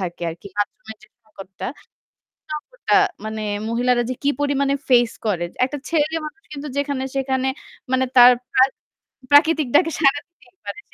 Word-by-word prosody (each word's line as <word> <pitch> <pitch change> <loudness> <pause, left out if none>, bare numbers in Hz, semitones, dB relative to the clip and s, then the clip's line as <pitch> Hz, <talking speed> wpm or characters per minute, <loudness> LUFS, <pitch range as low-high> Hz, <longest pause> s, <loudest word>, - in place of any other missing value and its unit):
থাকে 175 -2 -5
আরকি, 165 +4 -11
bathroom-এর 215 +1 -4
যে - - -16 0.2
সংকটটা 195 -3 -9 0.8
সংকটটা 480 +12 -3 0.3
মানে 215 0 -4 0.3
মহিলারা 240 +1 +2
যে - - -1
কি 285 - +3
পরিমাণে 280 -1 +1
face 240 -2 +4
করে। 180 -5 0 0.2
একটা 290 +2 -4
ছেলে 320 0 +1
মানুষ 400 +7 -11
কিন্তু 290 +1 -6
যেখানে 280 -2 -1
সেখানে 265 0 0 0.4
মানে 260 0 +3
তার 245 0 +10 0.2
প্রাকৃ 260 +1 +4 0.6
প্রাকৃতিক 305 0 +5
ডাকে 325 +2 +5
সাড়া 290 -1 +3
দিতেই 350 +1 -26
পারে। 420 - -6
265 Hz, 150 wpm, -21 LUFS, 235-295 Hz, 0.8 s, তার